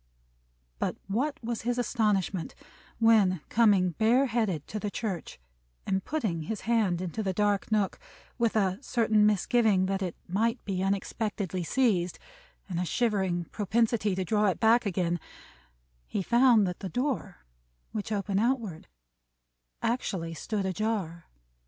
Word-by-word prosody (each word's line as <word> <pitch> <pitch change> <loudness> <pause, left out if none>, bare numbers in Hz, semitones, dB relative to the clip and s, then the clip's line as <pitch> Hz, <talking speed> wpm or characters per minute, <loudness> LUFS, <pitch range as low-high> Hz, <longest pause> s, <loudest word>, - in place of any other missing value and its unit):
But - - -1
what 270 +9 -1
was 230 -1 -3
his 240 +1 -1
astonishment 210 -7 0 0.4
when, 215 -7 +4
coming 205 -6 +4
bare 230 - +3
headed 220 - -1
to 215 - -3
the 210 - -3
church, 200 - -4 0.5
and 190 -1 0
putting 215 - -2
his 210 +7 -4
hand 215 -7 +1
into 185 +4 -3
this 190 -3 -2
dark 205 0 +1
nook, 210 -3 +1 0.4
with 230 -2 +1
a 195 -2 +1
certain 220 -5 +3
misgiving 210 -1 +3
that 195 +1 -1
it 180 -3 -3
might 225 +6 +1
be 190 -2 -2
unexpectedly 195 -1 -2
seized, 185 -5 +1 0.5
and 175 -3 -3
a - - +1
shivering 190 -4 0
propensity 215 -1 +1
to 190 0 -2
draw 210 +2 +2
it 190 - 0
back 230 0 +4
again, 175 -2 0 0.9
he 195 - -2
found 235 -1 +5
that 180 -1 -4
the 190 - -5
door, 245 - -3 0.5
which 215 0 -4
opened 200 -1 0
outward, 225 -8 -1 1.0
actually 190 -8 -1
stood 200 +5 -3
ajar! 190 -4 -2
205 Hz, 140 wpm, -28 LUFS, 185-230 Hz, 1.0 s, found